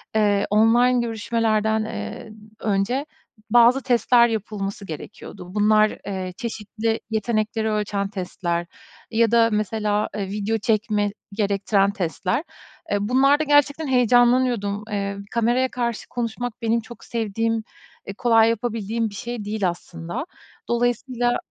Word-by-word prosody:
eee, 205 -2 +2
online 240 +4 +4
görüşmelerden, 220 -1 0
eee, 220 0 -6 0.3
önce 215 +7 0 0.4
bazı 240 +3 +5
testler 240 -1 +4
yapılması 205 -1 -4
gerekiyordu. 180 +3 -9
Bunlar, 215 +1 +3
eee, 185 -2 -4
çeşitli 225 0 -3
yetenekleri 220 0 -1
ölçen 205 -1 -1
testler 175 -3 -3 0.4
ya 230 -1 +3
da 230 -1 +5
mesela, 210 0 0
eee, 200 -2 -3
video 210 +2 -1
çekme 215 -2 0 0.2
gerektiren 200 -1 +1
testler. 185 - -2 0.5
Eee, 205 - +3
bunlarda 270 +7 +3
gerçekten 290 +1 +3
heyecanlanıyordum. 245 -4 +3
Eee, 200 -1 -2
kameraya 240 +3 +2
karşı 235 -2 -3
konuşmak, 240 0 -4
benim 230 0 +1
çok 230 +2 -13
sevdiğim, 225 0 -1 0.4
e, 195 - -6
kolay 225 0 +4
yapabildiğim 230 -1 -2
bir 200 - -11
şey 235 -1 -5
değil 205 -3 0
aslında. 170 - -6 0.4
Dolayısıyla 245 +1 0
220 Hz, 115 wpm, -23 LUFS, 205-235 Hz, 0.5 s, bazı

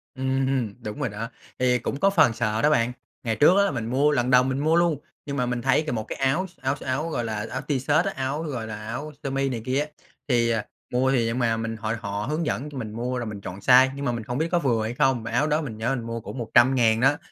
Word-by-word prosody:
Ừm, 130 -4 0
đúng 105 +5 -6
rồi 135 -5 -1
đó, 110 +3 -5 0.3
thì 125 -1 +3
cũng 140 +4 -3
có 195 - +4
phần 160 -11 +4
sợ 110 0 -1
đó 150 - +4
bạn. 120 -5 +2 0.3
Ngày 115 -2 0
trước 170 - +5
á 200 - +5
là - - 0
mình 120 -5 -3
mua 135 +5 +2
lần 125 -3 +1
đầu 125 0 +7
mình 130 +1 -1
mua 155 +3 +2
luôn, 170 -4 +2 0.3
nhưng 140 -1 -4
mà 125 - +1
mình 125 0 -2
thấy 135 +4 +3
c - - 0
một 110 -2 -2
cái - - -6
áo 135 +8 +1
s 170 -5 -24
áo 135 +1 0
áo, 140 +6 -1
gọi 120 -6 -2
là, 110 -1 -3
áo 130 - -3
t-shirt 145 +3 +2
á, 195 - -1
áo, 135 +4 -2
gọi 125 -8 -4
là, 105 0 -7
áo 145 +7 -5
sơ 140 - -2
mi 135 0 0
này 120 -3 -3
kia 130 +2 +1
á, 150 - -1 0.4
thì, 120 -3 +2
ờ, 115 -1 +1 0.3
mua 130 +2 +2
thì 125 -4 +2
nhưng 115 +2 -1
mà 115 -2 +1
mình 115 0 -3
họ 110 0 -2
họ 100 -2 -3
hướng 155 +2 -1
dẫn 145 +1 -2
cho 145 - -9
mình 110 -4 -5
mua 125 +2 -2
rồi 120 - -3
mình 105 -2 -6
chọn 95 0 -7
size 130 +5 +6
nhưng 140 - -4
mà 125 - +1
mình 115 -2 -4
không 120 +3 -4
biết 160 - +1
có 175 - +3
vừa 120 -7 +1
hay 110 +2 -3
không, 130 -4 +2
mà 110 - -5
áo 135 +6 +2
đó 155 +1 +1
mình 115 -8 -6
nhớ 120 +4 0
mình 120 - -5
mua 115 0 -4
cũng 135 - -8
100.000 120 -1 +4
đó. 135 +4 +4
125 Hz, 290 wpm, -25 LUFS, 115-140 Hz, 0.4 s, đầu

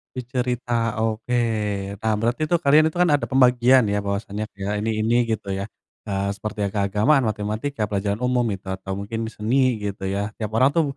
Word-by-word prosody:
Dicerita, 120 -2 -2
oke. 115 +3 -1 0.6
Nah, 110 -1 +1
berarti 120 +7 -1
tuh 175 - +4
kalian 155 0 +4
itu 175 - -9
kan 180 - +4
ada 120 -6 0
pembagian 125 -1 +5
ya 105 0 0
bahwasannya 100 +1 -3
kayak 105 +1 -2
ini 110 0 -1
ini 120 +2 +3
gitu 100 -3 -2
ya. 100 +3 -4 0.4
Eee, 100 0 -1
seperti 105 0 -4
keagamaan, 105 +8 +3
matematika, 110 +3 -2
pelajaran 100 0 -1
umum 125 0 +1
itu, 100 -1 -5
atau 95 0 -5
mungkin 110 +3 -4
seni 125 +3 +1
gitu 100 -2 -4
ya. 100 +2 -2
Tiap 110 -2 -4
orang 135 +4 +4
tuh 165 - +3
110 Hz, 175 wpm, -23 LUFS, 100-125 Hz, 0.6 s, pembagian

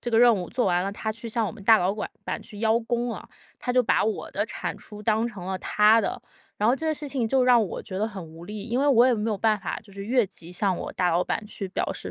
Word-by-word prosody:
这 - - -4
个 225 - +4
任 240 -2 +7
务， 180 -3 -4
做 250 - 0
完 180 0 +2
了， 200 - -2
他 220 +1 -3
去 230 +2 -6
向 225 0 0
我 - - -3
们 225 - -12
大老板 210 -2 +3 0.2
板 - - -3
去 210 -3 -10
邀 225 +1 +3
功 240 0 -2
啊， - - -9 0.3
他 250 - -2
就 250 0 +4
把 220 - +2
我 220 - -2
的 - - -1
产 - - -4
出 210 -1 -11
当 220 +2 +2
成 205 -6 -7
了 190 0 -3
他 215 +4 +4
的。 205 - -3 0.4
然 210 - +2
后 240 - +5
这 320 +4 -4
个 315 - +1
事 295 0 -6
情 255 -5 -1
就 265 0 +3
让 245 -2 +6
我 - - -6
觉 190 -3 -6
得 215 - 0
很 195 -5 -7
无 165 +2 -12
力， 210 -1 -6
因 240 +3 -1
为 285 - +2
我 245 -3 +6
也 255 - +4
没 220 0 -1
有 210 - 0
办 215 +1 +2
法， 185 - -3
就 205 -2 -16
是 195 0 -7
越 245 -3 +3
级 175 -3 -10
向 190 +1 +1
我 - - -5
大 180 -1 +2
老 170 +2 +2
板 215 - -2
去 200 -2 -5
表 - - -2
示 - - -6
220 Hz, 325 characters per minute, -26 LUFS, 195-235 Hz, 0.4 s, 任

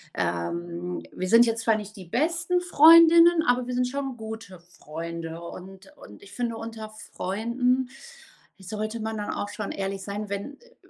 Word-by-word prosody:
ähm, 170 - -3
wir 185 - -4
sind 230 +3 +7
jetzt 230 -1 -1
zwar 225 -1 +3
nicht 210 0 -8
die 185 - -10
besten 330 - 0
Freundinnen, 335 0 +7
aber 245 0 +2
wir 250 - -3
sind 250 0 +1
schon 270 -1 -4
gute 220 -4 -8
Freunde. 165 -1 -8
Und 190 +3 -11
und 105 - -14
ich 200 - -14
finde, 235 -2 -3
unter 225 -1 -7 0.2
Freunden 245 +6 -1 0.7
sollte 215 +4 -5
man 220 0 -3
dann 210 - -3
auch 205 - -3
schon 205 0 -5
ehrlich 195 0 -4
sein, 205 +2 -5
wenn 200 +8 -5
äh, 485 0 -23
215 Hz, 165 wpm, -26 LUFS, 185-250 Hz, 0.7 s, sind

